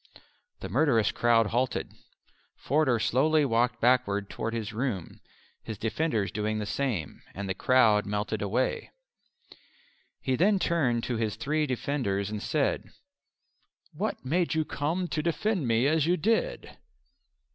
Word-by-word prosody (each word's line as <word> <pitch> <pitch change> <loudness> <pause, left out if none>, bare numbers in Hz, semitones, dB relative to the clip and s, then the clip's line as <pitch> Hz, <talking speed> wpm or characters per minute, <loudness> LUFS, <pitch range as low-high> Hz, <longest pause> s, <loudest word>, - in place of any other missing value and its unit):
The - - -4
murderous 115 -9 +3
crowd 115 -1 +3
halted. 125 +1 -1 0.6
Forder 140 -5 +1
slowly 140 +8 +2
walked 120 0 +1
backwards 115 -5 +2
toward 115 - -3
his 110 -1 -4
room, 110 -7 -3 0.4
his 110 - -7
defenders 110 - -1
doing 110 0 -2
the 105 - -3
same, 110 - -3
and 100 0 -4
the 95 - -1
crowd 110 -3 +3
melted 105 +1 -2
away. 110 +6 -1 1.3
He 130 -2 0
then 195 +8 +3
turned 135 -11 +1
to 120 - -2
his 110 -2 -1
three 150 +6 -1
defenders 115 -7 -2
and 105 -1 -4
said, - - -1 1.0
"What - - -3
made 170 +4 0
you 160 -1 +1
come 165 +7 -2
to 155 0 -1
defend 170 - -1
me 115 +2 +2
as 155 +1 +2
you 180 +1 +3
did?" 225 +8 -1
125 Hz, 135 wpm, -28 LUFS, 110-150 Hz, 1.3 s, murderous